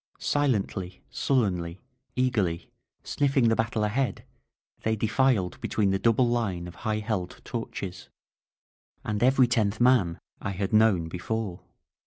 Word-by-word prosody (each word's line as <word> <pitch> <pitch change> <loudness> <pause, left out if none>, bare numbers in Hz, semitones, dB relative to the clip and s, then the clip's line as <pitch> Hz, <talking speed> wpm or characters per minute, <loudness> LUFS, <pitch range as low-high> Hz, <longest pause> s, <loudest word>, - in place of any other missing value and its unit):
Silently, 100 -10 -1
sul 135 -2 +2
lenly, 85 -3 -3 0.4
eagerly, 105 -10 0 0.3
sniffing 135 -4 +2
the 115 - +3
battle 115 -1 0
ahead, 120 +5 -1 0.6
they 110 0 +1
defiled 110 -3 +1
between 100 -3 +1
the 95 - +1
double 115 +3 +3
line 100 -8 -1
of 90 - -9
high 105 +5 -2
held 105 -4 -3
torches. 90 -2 -5 0.9
And 105 0 -2
every 130 +1 +5
tenth 110 -3 +1
man 120 -9 +3 0.2
I 100 - -3
had 95 +2 -3
known 105 -6 +4
before. 95 +2 -4
110 Hz, 130 wpm, -27 LUFS, 95-120 Hz, 0.9 s, every